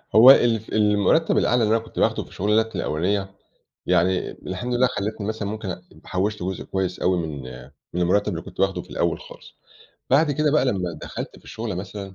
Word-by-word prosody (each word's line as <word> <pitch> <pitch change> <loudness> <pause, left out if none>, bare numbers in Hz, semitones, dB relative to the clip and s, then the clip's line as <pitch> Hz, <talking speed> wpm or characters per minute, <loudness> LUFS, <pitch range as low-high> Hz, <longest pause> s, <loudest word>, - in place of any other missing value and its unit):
هو 120 +4 +10
ال 115 -4 +3
المرتب 105 - +3
الأعلى 120 -1 +3
اللي 110 +1 +3
أنا 115 - -1
كنت 115 - -8
باخده - - +1
في - - -17
الشغلانات 110 +3 0
الأولانية، 95 +5 -1 0.5
يعني 90 +2 +2
الحمد 105 +7 -5
لله 125 +1 +4
خلتني 105 -3 -3
مثلًا 110 -1 -3
ممكن 110 -1 -5
أ 90 0 -5 0.2
حوشت 100 +2 -2
جزء 95 +1 -4
كويّس 95 -1 -3
أوي 90 0 +2
من 80 -5 -4 0.5
من 90 - -1
المرتب 100 +4 +2
اللي 85 -1 -4
كنت - - -10
باخده 95 0 +1
في - - -18
الأوّل - - -1
خالص، - - -14 0.5
بعد 145 +4 +4
كده 150 +1 +1
بقى 150 -3 +3
لمّا 95 -9 -1
دخلت - - -6
في - - -24
الشُغلة 110 -3 -5
مثلًا 95 +1 -7
105 Hz, 195 wpm, -23 LUFS, 95-115 Hz, 0.5 s, هو